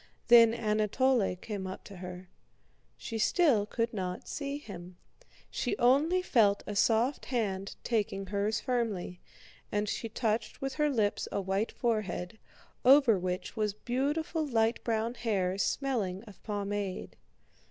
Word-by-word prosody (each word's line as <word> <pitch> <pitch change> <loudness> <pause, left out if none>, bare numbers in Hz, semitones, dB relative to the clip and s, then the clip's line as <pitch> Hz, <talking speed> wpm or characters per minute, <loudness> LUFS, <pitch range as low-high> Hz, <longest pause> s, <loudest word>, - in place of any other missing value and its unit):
Then 230 -1 +9
Anatole 215 0 +1
came 195 0 -5
up 185 - -7
to 200 - -11
her. 180 0 -8 0.7
She 225 -1 -5
still 235 - +3
could 230 +1 -1
not 185 -3 -4
see 280 -1 -3
him. 180 -9 -10 0.5
She - - -2
only 300 +9 +3
felt 210 - +3
a 210 - -5
soft 230 +6 +2
hand 200 -6 -2
taking 205 -4 -1
hers 205 +3 -1
firmly, 215 -8 -2 0.5
and 210 0 0
she 225 +2 -3
touched 220 0 -1
with 270 0 -3
her 300 +1 +1
lips 215 -7 0
a - - -1
white 195 +3 -1
forehead, 215 -4 -2 0.4
over 255 -6 +6
which 180 0 -3
was 210 -2 -1
beautiful 290 +8 -1
light 230 -5 +1
brown 230 0 0
hair 205 -6 -1
smelling 210 -8 -1
of 210 -5 -15
pomade. 205 -2 -3
220 Hz, 135 wpm, -30 LUFS, 195-245 Hz, 0.7 s, Then